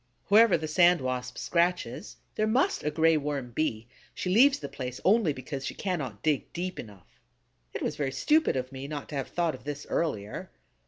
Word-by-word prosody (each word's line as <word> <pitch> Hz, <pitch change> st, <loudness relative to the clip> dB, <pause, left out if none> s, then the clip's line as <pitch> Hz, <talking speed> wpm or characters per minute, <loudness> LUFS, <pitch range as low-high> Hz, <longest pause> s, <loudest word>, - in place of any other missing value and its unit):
Wherever 210 Hz, -2 st, +6 dB
the 160 Hz, 0 st, -4 dB
Sand 175 Hz, +2 st, +5 dB
Wasp 125 Hz, -1 st, -3 dB
scratches, 180 Hz, +4 st, -1 dB, 0.2 s
there 215 Hz, -, 0 dB
must 265 Hz, -, +1 dB
a 150 Hz, -, +1 dB
Gray 160 Hz, +1 st, +3 dB
Worm 140 Hz, -4 st, -3 dB
be; 115 Hz, -4 st, -2 dB, 0.3 s
she 180 Hz, -, -2 dB
leaves 270 Hz, +6 st, +6 dB
the -, -, -6 dB
place 125 Hz, -1 st, -6 dB
only 205 Hz, -4 st, +4 dB
because 135 Hz, 0 st, -6 dB
she -, -, -4 dB
cannot 140 Hz, -, -3 dB
dig 150 Hz, -4 st, 0 dB
deep 180 Hz, +2 st, -4 dB
enough. 100 Hz, -5 st, -12 dB, 0.6 s
It -, -, -3 dB
was -, -, -2 dB
very 140 Hz, -2 st, -1 dB
stupid 300 Hz, -, +2 dB
of 130 Hz, 0 st, -3 dB
me 135 Hz, +1 st, -7 dB
not 145 Hz, -1 st, -6 dB
to 150 Hz, -, -6 dB
have 135 Hz, -2 st, -2 dB
thought 170 Hz, -2 st, 0 dB
of 130 Hz, -, -10 dB
this 145 Hz, +1 st, -5 dB
earlier. 110 Hz, -11 st, -2 dB
150 Hz, 195 wpm, -28 LUFS, 130-180 Hz, 0.6 s, Wherever